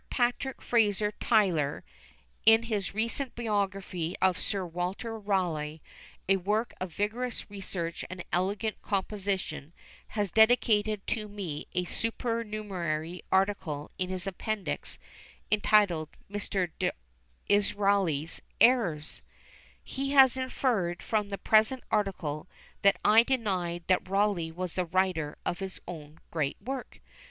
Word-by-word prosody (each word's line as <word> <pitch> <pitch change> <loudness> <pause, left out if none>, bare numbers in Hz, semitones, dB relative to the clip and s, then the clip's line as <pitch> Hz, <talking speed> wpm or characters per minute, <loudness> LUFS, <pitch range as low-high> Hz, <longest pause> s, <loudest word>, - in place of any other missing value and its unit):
PATRICK 245 +2 0
FRASER 210 -3 +2
TYTLER, 180 -11 +2 0.6
in 225 +1 +7
his 210 -4 -2
recent 230 +4 -1
biography 195 -6 -1
of 185 -1 +4
Sir 195 -3 -1
Walter 180 +7 -3
Rawleigh, 175 -8 -1 0.5
a 195 +1 +4
work 210 +5 0
of 185 -1 -3
vigorous 225 +7 -2
research 185 -4 -4
and 185 -1 -7
elegant 200 +4 0
composition, 190 -6 -2 0.3
has 205 -4 -2
dedicated 220 -2 +4
to 215 -2 -2
me 190 -8 -5
a 180 0 0
supernumerary 205 -8 -2
article 190 -7 0
in 185 0 -1
his 185 -1 -3
Appendix, 200 +2 -3 0.5
entitled 205 -7 +3 0.2
Mr. 195 -3 -1 0.8
D'Israeli's 200 -6 +2 0.2
Errors! 210 -12 +3 0.6
He 275 +1 -2
has 265 -3 +7
inferred 240 -9 0
from 210 -2 0
the 200 - -3
present 220 +6 +3
article, 185 -8 -1 0.3
that 200 0 +5
I 220 +2 +8
denied 190 -9 -1
that 185 0 +1
Rawleigh 195 -4 +1
was 180 +1 -4
the 185 - 0
writer 175 -4 0
of 175 - -1
his 190 -1 -5
own 155 -3 -8
great 150 -4 -1
work! 260 +4 -6
195 Hz, 115 wpm, -29 LUFS, 175-215 Hz, 0.8 s, I